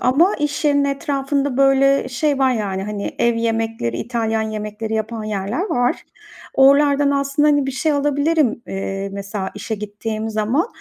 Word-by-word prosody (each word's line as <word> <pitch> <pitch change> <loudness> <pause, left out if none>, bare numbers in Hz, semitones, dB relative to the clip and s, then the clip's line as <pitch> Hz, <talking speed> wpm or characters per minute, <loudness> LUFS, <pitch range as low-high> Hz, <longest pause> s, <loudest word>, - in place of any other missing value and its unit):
ama 325 +11 +3
iş 295 0 -2
yerinin 285 -1 +3
etrafında, 275 -1 -1
böyle, 275 0 +4
şey 280 +3 0
var, 265 -1 +3
yani, 195 -4 -2
hani, 205 0 -4
ev 235 0 +2
yemekleri, 225 - -1
İtalyan 225 -2 -1
yemekleri 215 0 -4
yapan 220 0 -3
yerler 210 - -2
var. 245 -4 +1 0.6
Oralardan 280 +1 +5
aslında, 280 +1 +1
hani, 290 -2 +3
bir - - -1
şey 305 +4 0
alabilirim, 285 -3 +1
eee, 195 0 -4
mesela, 200 -1 -4
işe 210 +2 -4
gittiğim 215 +1 -4
zaman. 220 - 0
245 Hz, 150 wpm, -20 LUFS, 215-280 Hz, 0.6 s, Oralardan